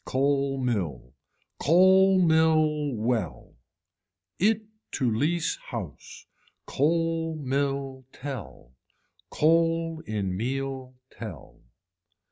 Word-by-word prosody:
Coal 140 0 0
mill. 90 - -2 0.5
Coal 190 +4 +5
mill 155 -3 +3
well. 110 -4 -2 0.9
It 215 +3 +2 0.3
to 130 - 0
lease 155 +9 0
house. 100 - -8 0.4
Coal 165 +2 0
mill 135 -2 -2
tell. 125 - -8 0.6
Coal 165 0 +2
in 100 -4 -2
meal 130 +3 -4 0.2
tell. 100 -11 -10
140 Hz, 80 wpm, -26 LUFS, 120-165 Hz, 0.9 s, Coal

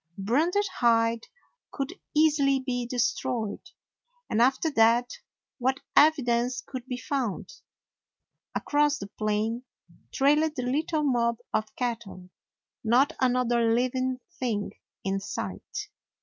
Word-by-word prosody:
A - - -6
branded 320 - +2
hide 230 -1 +3 0.4
could 275 +4 -3 0.2
easily 290 -3 +4
be 245 -2 -3
destroyed, 240 -3 -2 0.6
and 220 - +2
after 265 +6 +3
that, 235 0 +4 0.5
what 260 +2 +1 0.2
evi 300 -3 +5
dence 245 +1 0
could 260 -2 -7
be 250 -2 -3
found? 250 -6 -3 1.0
Across 295 0 +2
the 285 - -6
plain 215 +3 -1 0.5
trailed 295 +3 +3
the 250 - -3
little 300 +5 0
mob 235 -4 +2 0.2
of 215 0 -1
cattle; 225 -7 -4 0.5
not 245 +6 +3
another 245 -2 +2
living 255 +1 0 0.2
thing 220 -5 -1 0.3
in 195 0 -1
sight. 420 - -5
250 Hz, 115 wpm, -27 LUFS, 230-280 Hz, 1.0 s, evi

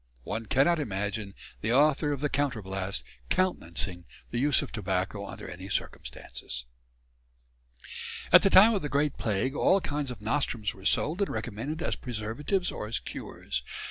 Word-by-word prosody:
One 110 - -4
cannot 155 +8 +4
imagine 105 -4 -3 0.3
the 115 +2 +1
author 145 +2 +4
of 140 -2 -2
the 150 - +2
"Counterblaste" 100 - -2 0.3
countenancing 90 - -1 0.3
the 120 - -1
use 145 +1 +4
of - - -7
tobacco 95 0 -2
under - - -8
any - - -8
circumstances. - - -4 1.7
At - - +11
the 195 - +5
time 210 +5 +8
of 200 - 0
the 145 - -3
Great 145 +1 +1
Plague 110 +5 0
all 195 - +4
kinds 145 -5 -2
of 125 -4 -6
nostrums 115 -2 -1
were 95 0 -14
sold 160 - +3
and 200 - +2
recommended 135 +9 -3
as - - 0
preservatives 125 - -1
or 105 - -5
as 115 - 0
cures. 60 - -4
120 Hz, 155 wpm, -29 LUFS, 100-150 Hz, 1.7 s, At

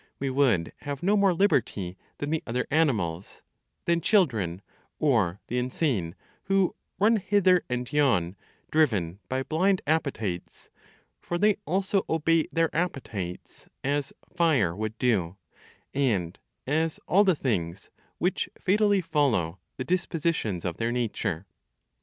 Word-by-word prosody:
We 135 -1 -2
would 125 -11 +2
have 145 +2 -5
no 200 +3 +3
more 200 -2 +4
liberty 130 - +1 0.2
than 145 +1 -3
the 160 - 0
other 125 +2 -1
animals, 105 - 0 0.4
than 170 0 +2
children, 110 - +2 0.3
or 110 - +1
the 125 - -1
insane, 125 - -1 0.3
who 195 -1 +2 0.2
run 220 +3 +4
hither 190 -2 +3
and 125 +1 -3
yon, 100 -12 +2 0.4
driven 105 - +1
by 130 +1 -1
blind 185 +6 +1
appetites; 120 - -2 0.5
for 175 - -3
they 210 +2 +3
also 190 +2 +1
obey 165 0 +2
their 165 -1 +1
appetites, 115 - -4 0.2
as 140 +1 -1 0.2
fire 145 - +3
would 110 +2 -4
do, 100 -7 +1 0.6
and 105 -12 0 0.3
as 160 +3 0
all 200 +3 +5
the 190 -4 +3
things 95 - -2 0.3
which - - 0
fatally 205 0 +3
follow 115 - +1 0.2
the 130 - -2
dispositions 165 - -1
of 85 -2 -2
their 115 +1 -1
nature. 105 -7 -2
140 Hz, 130 wpm, -27 LUFS, 100-170 Hz, 0.6 s, all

